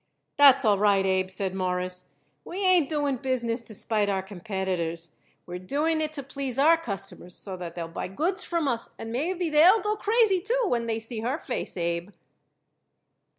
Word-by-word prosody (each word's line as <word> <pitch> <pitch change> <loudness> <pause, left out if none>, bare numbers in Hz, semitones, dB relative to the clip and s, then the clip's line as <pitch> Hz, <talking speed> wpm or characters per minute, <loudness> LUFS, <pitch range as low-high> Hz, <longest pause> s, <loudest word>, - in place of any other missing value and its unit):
"That's 275 -3 +7
all 205 -2 +4
right, 200 -2 +3
Abe," 190 0 +1
said 190 0 -3
Morris. 180 -1 -2 0.3
"We 380 +3 -4
ain't 360 -6 +4
doing 290 -4 0
business 240 -2 -1
to 225 -2 -8
spite 210 0 0
our 190 -1 0
competitors; 185 -4 -4 0.3
we're 180 0 -6
doing 305 - 0
it 310 -1 -1
to 285 -3 -4
please 270 -1 -5
our 310 +5 +6
customers 195 - -5
so 190 -2 -4
that 175 -2 -7
they'll 170 -2 -4
buy 165 - -5
goods 340 - -1
from 335 -4 -1
us 235 -3 -1
and 225 - -7
maybe 335 +7 -1
they'll 345 +8 +7
go 420 0 -1
crazy, 425 -3 +2
too, 485 +5 0
when 235 - 0
they 225 -1 0
see 225 0 -6
her 245 +6 -1
face, 265 - -4
Abe." 170 +1 -2
230 Hz, 180 wpm, -26 LUFS, 190-310 Hz, 0.3 s, That's